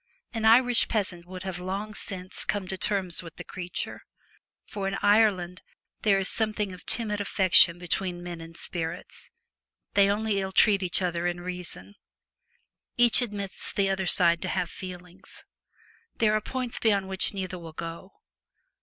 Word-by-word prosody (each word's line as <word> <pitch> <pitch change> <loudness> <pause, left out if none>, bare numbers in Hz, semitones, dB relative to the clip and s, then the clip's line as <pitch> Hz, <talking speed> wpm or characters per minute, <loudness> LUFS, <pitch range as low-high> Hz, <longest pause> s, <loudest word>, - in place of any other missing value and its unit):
An 225 -1 -2
Irish 245 +2 +5
peasant 180 -5 -1
would 185 0 -8
have 190 -2 -4
long 195 +4 -4
since 185 -3 -5
come 200 -3 -2
to 190 - -2
terms 190 -2 -1
with 165 -2 -11
the - - -8
creature. 180 -1 -5 0.6
For 195 -2 -4
in 195 - -2
Ireland 200 -4 +3 0.4
there 200 -3 +4
is 195 0 0
something 215 -3 +1
of 180 - -13
timid 210 -3 +1
affection 185 -3 +5
between 175 0 -3
men 175 -2 -6
and 165 0 -11
spirits. 170 0 -6 0.6
They 200 -1 +5
only 205 -1 0
ill 190 0 -4
treat 200 0 +5
each 185 0 +1
other 175 -1 -1
in 175 0 -2
reason. 175 - -6 1.0
Each 240 +1 +5
admits 205 -5 -2
the 195 -1 +1
other 190 -1 -1
side 170 -2 +3
to 185 - -3
have 180 -2 -1
feelings. 180 0 -10 0.7
There 215 -2 +2
are 215 - +2
points 250 +2 -4
beyond 200 -4 +2
which 190 +1 0
neither 185 -2 -4
will 165 -2 -10
go. 165 +4 -7
190 Hz, 160 wpm, -27 LUFS, 175-205 Hz, 1.0 s, Irish